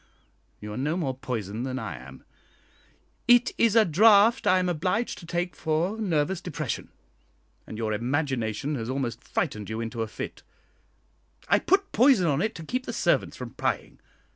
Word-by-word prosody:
You 105 0 -7
are - - -6
no 150 +6 -1
more 140 -7 -1
poisoned 120 -4 -4
than 130 0 -3
I 110 -9 -4
am; 65 +1 -12 1.0
it 245 +1 +6
is 230 -2 +4
a 225 -2 +6
draught 210 +6 +5
I 185 - +5
am 185 0 +1
obliged 180 +7 -1
to 170 - -12
take 175 +1 -2
for 160 +6 0
nervous 170 -2 0
depression, 160 -8 -4 0.8
and 110 - -7
your 110 -1 -1
imagination 130 +1 -1
has 115 0 -4
almost 125 -3 -3
frightened 110 - -3
you 110 +1 -3
into 115 0 -4
a 110 - -1
fit. - - -7 1.1
I - - +5
put 390 +1 +1
'poison' 245 -6 +5
on 150 -2 +1
it 220 +2 -1
to 165 - -7
keep 255 +8 -3
the - - -3
servants - - +1
from - - -7
prying. - - -3
150 Hz, 170 wpm, -26 LUFS, 115-190 Hz, 1.1 s, it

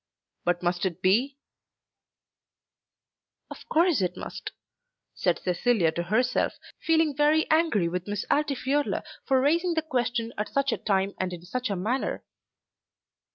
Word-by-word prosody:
But 175 0 0
must 175 0 0
it 185 -2 -1
be?" 245 +9 +2 2.1
"Of - - -11
course 330 - +3
it 180 -1 -1
must," - - -6 0.6
said - - +1
Cecilia 180 -1 +1
to 170 - -3
herself, 235 +8 +1 0.3
feeling 320 -3 +2
very 300 +2 +3
angry 315 - +3
with 180 +2 -4
Miss 205 -1 -3
Altifiorla 285 -1 0 0.2
for 265 -1 +3
raising 335 +6 +2
the 320 - +1
question 240 -5 -1
at 210 - -2
such 275 -1 +1
a - - 0
time 195 -1 0
and 185 -1 -1
in 175 -1 -8
such 250 +5 -3
a 200 - -1
manner. 220 +9 -2
245 Hz, 140 wpm, -27 LUFS, 185-290 Hz, 2.1 s, course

